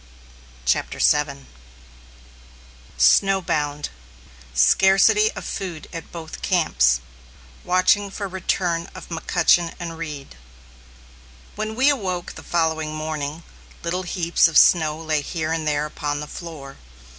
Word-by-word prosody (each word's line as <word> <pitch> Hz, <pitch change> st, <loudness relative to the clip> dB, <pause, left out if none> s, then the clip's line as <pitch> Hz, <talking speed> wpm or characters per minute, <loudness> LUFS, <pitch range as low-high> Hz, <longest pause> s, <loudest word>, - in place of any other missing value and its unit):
] -, -, -24 dB
CHAPTER 60 Hz, -, 0 dB
VII 145 Hz, -2 st, +1 dB, 1.5 s
SNOWBOUND 150 Hz, -, +2 dB, 0.7 s
SCARCITY 195 Hz, -, +5 dB
OF -, -, -8 dB
FOOD 175 Hz, -5 st, -5 dB
AT 165 Hz, -, -8 dB
BOTH 160 Hz, -2 st, -8 dB
CAMPS 60 Hz, 0 st, +2 dB, 0.6 s
WATCHING 185 Hz, +3 st, +2 dB
FOR 200 Hz, +1 st, -5 dB
RETURN 180 Hz, -2 st, -1 dB
OF -, -, -11 dB
M'CUTCHEN 170 Hz, 0 st, +2 dB
AND 165 Hz, -2 st, -6 dB
REED. 145 Hz, -, -7 dB, 1.2 s
When 215 Hz, +1 st, -4 dB
we 265 Hz, +4 st, +4 dB
awoke 185 Hz, -10 st, -2 dB
the -, -, -10 dB
following 160 Hz, -2 st, -1 dB
morning, 155 Hz, 0 st, -4 dB, 0.4 s
little 175 Hz, +2 st, -2 dB
heaps 175 Hz, -2 st, +2 dB
of 165 Hz, -, +1 dB
snow 155 Hz, -3 st, +5 dB
lay 155 Hz, -2 st, -1 dB
here 160 Hz, +1 st, -3 dB
and 160 Hz, -1 st, -2 dB
there 150 Hz, 0 st, 0 dB
upon 145 Hz, -1 st, -3 dB
the 150 Hz, -, -5 dB
floor. 150 Hz, -4 st, -9 dB
165 Hz, 120 wpm, -22 LUFS, 150-180 Hz, 1.5 s, SCARCITY